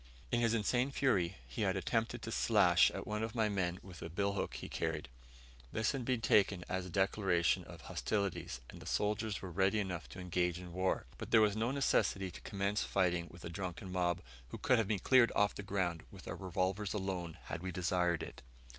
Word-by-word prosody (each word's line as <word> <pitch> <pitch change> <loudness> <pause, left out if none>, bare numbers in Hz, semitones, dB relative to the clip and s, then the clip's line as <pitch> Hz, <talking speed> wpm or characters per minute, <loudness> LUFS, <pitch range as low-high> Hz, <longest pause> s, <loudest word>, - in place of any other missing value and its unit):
In 120 - +2
his 115 -1 +3
insane 120 +4 +2
fury 95 -11 +1
he - - -5
had 95 -2 +2
attempted 115 +4 -1
to 115 - -4
slash 95 -7 +5
at - - -6
one 105 0 -2
of 110 +1 -3
my 110 -2 +3
men 90 -3 -1
with 90 -3 -11
a 85 - -5
billhook 100 +3 -1
he - - -6
carried. 80 -4 -2 0.6
This 110 0 +1
had 135 -4 -3
been 125 -2 +1
taken 100 -5 +3
as 95 0 -2
a - - -8
declaration 95 -1 +2
of - - -11
hostilities, 95 - -2
and - - -11
the - - -9
soldiers 105 0 0
were 95 - -5
ready 95 +4 +2
enough 95 -4 -3
to 95 - -9
engage 90 -1 0
in 90 -1 -9
war; 95 +1 0
but - - -6
there 115 - +6
was 105 -1 +4
no 110 +2 +1
necessity 100 -8 +1
to - - -10
commence 100 +1 -1
fighting 90 -3 +1
with 90 - -11
a - - -4
drunken 90 +1 -5
mob, 90 -1 +1 0.3
who - - -7
could 125 - +3
have 110 - +1
been 105 -1 +1
cleared 120 +4 +5
off 105 0 +3
the - - -6
ground 95 -4 -1
with - - -12
our - - -3
revolvers 95 +2 -1
alone 95 -4 -3
had - - -5
we 95 0 -3
desired 90 -1 +1
it. - - -9
95 Hz, 210 wpm, -35 LUFS, 90-105 Hz, 0.6 s, there